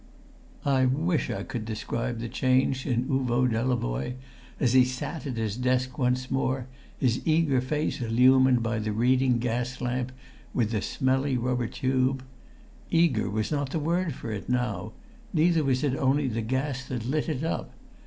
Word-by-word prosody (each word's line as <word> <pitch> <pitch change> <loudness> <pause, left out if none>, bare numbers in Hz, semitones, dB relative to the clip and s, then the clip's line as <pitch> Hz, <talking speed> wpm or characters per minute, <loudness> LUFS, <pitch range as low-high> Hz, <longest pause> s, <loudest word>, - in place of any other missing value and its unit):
I 135 -2 +3
wish 155 +6 +1
I - - -3
could 120 -3 -5
describe 115 +2 -3
the 115 +1 -4
change 130 +2 +1
in 125 -1 +1
Uvo 130 -3 +1
Delavoye 115 - -1 0.4
as 125 -3 +2
he 130 -1 +7
sat 130 +5 -4
at 125 -4 -4
his 110 -2 -1
desk 125 +1 0
once 125 0 0
more, 130 -1 0 0.3
his 125 -2 +1
eager 155 -5 +3
face 150 +2 -2
illumined 125 +1 +4
by 115 -1 -1
the 110 0 -2
reading 125 +2 +3
gas 125 +1 -2
lamp 125 +1 -2 0.4
with 115 -3 +1
the 105 -3 0
smelly 130 0 0
rubber 125 -1 0
tube. 130 0 0 0.7
Eager 165 -10 +2
was 110 +4 -2
not 145 -2 -1
the 160 - -2
word 165 0 0
for 115 - -6
it 105 +1 -5
now, 110 -5 -1 0.4
neither 165 -1 +3
was 130 0 +1
it 135 -3 +1
only 135 +1 +2
the 115 -2 -1
gas 130 +3 -2
that 120 -3 -4
lit 150 +6 -1
it 150 -2 -2
up. 165 - -2
130 Hz, 165 wpm, -27 LUFS, 120-135 Hz, 0.7 s, he